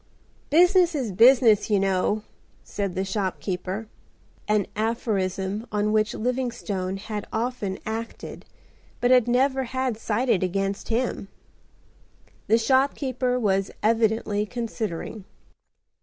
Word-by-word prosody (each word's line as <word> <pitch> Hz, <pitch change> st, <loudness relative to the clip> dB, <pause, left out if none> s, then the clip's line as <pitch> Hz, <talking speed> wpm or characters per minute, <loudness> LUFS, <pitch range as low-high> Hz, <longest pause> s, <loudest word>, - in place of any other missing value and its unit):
"Business 355 Hz, +2 st, +5 dB
is 255 Hz, -7 st, -2 dB
business, 230 Hz, +1 st, +5 dB
you 205 Hz, -2 st, +3 dB
know?" 195 Hz, +2 st, +1 dB, 0.4 s
said 200 Hz, -3 st, -4 dB
the 190 Hz, +1 st, -1 dB
shopkeeper,—an 195 Hz, +1 st, -4 dB
aphorism 210 Hz, -2 st, -2 dB
on 210 Hz, 0 st, 0 dB
which 215 Hz, 0 st, +1 dB
Livingstone 230 Hz, -6 st, -2 dB
had 210 Hz, +1 st, -6 dB
often 225 Hz, -4 st, -2 dB
acted, 225 Hz, +1 st, -6 dB, 0.6 s
but 245 Hz, -, +2 dB
had 250 Hz, -2 st, +5 dB
never 260 Hz, +2 st, +2 dB
had 260 Hz, -2 st, -2 dB
cited 225 Hz, -2 st, +1 dB
against 195 Hz, +2 st, -2 dB
him. 230 Hz, -3 st, -1 dB, 1.2 s
The 225 Hz, -, +5 dB
shopkeeper 260 Hz, 0 st, +1 dB
was 195 Hz, -3 st, +1 dB
evidently 220 Hz, -2 st, +1 dB
considering. 220 Hz, -4 st, -4 dB
220 Hz, 100 wpm, -25 LUFS, 200-250 Hz, 1.2 s, Business